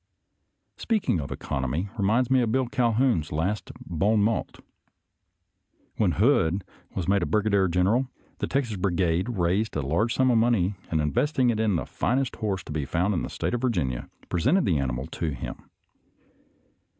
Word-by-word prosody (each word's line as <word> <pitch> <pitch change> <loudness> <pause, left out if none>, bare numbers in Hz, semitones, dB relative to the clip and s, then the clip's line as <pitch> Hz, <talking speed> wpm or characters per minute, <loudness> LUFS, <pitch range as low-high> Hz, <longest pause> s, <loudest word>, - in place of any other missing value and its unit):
Speaking 215 - 0
of 70 - -7
economy 70 +9 -2
reminds 115 +4 +1
me 130 -1 +5
of 115 -2 0
Bill 130 +1 +2
Cal 120 -1 +1
houn's 110 - +1
last 90 +8 -2
bon 100 +6 +1
mot. 110 +1 -1 1.4
When - - +2
Hood 85 +4 +2 0.3
was 90 -3 -2
made 100 0 +3
a - - 0
brigadier 105 -3 +2
general, 100 +9 +2 0.3
the - - -1
Texas 125 -7 -1
Brigade 90 +1 0
raised 100 +1 0
a 75 - -1
large 85 - +1
sum 130 -1 +3
of 115 - +4
money, 110 -5 +2 0.2
and 80 -2 +1
investing 125 - +1
it 110 - -2
in 110 -4 +2
the 80 - -1
finest 130 +1 -1
horse 100 -4 -2
to - - -9
be 75 -1 -2
found 90 +8 0
in 85 - 0
the - - -4
State - - -3
of 120 - -1
Virginia, 85 - -1 0.2
pre 85 - -1
sented 165 - +3
the 80 -6 +2
animal 65 -1 -2
to 80 -2 -3
him. - - -8
100 Hz, 175 wpm, -26 LUFS, 85-120 Hz, 1.4 s, me